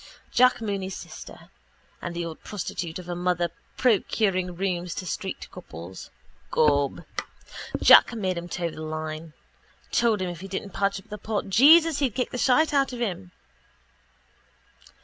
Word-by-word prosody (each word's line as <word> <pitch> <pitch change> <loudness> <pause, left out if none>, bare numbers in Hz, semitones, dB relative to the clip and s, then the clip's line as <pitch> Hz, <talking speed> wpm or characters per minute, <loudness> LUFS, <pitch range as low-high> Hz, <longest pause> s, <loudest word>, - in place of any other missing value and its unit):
Jack 250 -1 +4
Mooney's 195 -3 -3
sister. - - -11 0.5
And 170 0 -5
the 170 0 -2
old 165 -1 -8
prostitute 175 -4 -4
of 180 -1 -9
a 175 - -3
mother 175 -1 0 0.3
procuring 195 -6 +1
rooms 180 -1 -2
to 185 - -5
street 190 +2 -4
couples. 85 +3 -10 0.4
Gob, 145 -2 +2 0.8
Jack - - +8
made 190 -4 -1
him 170 +1 -6
toe 170 -1 -2
the 155 - -9
line. 155 0 -5 0.6
Told 230 -3 +3
him 180 - -2
if 170 - -9
he 195 - -8
didn't 195 +1 -5
patch 200 0 0
up 195 - -19
the 210 - -7
pot, 210 -1 -3
Jesus, 310 - +6
he'd 265 -7 0
kick 250 - -1
the 250 - -4
shite 295 +6 +3
out 275 -2 +2
of 245 - -6
him. 190 -5 -3
185 Hz, 155 wpm, -26 LUFS, 170-225 Hz, 0.8 s, Jack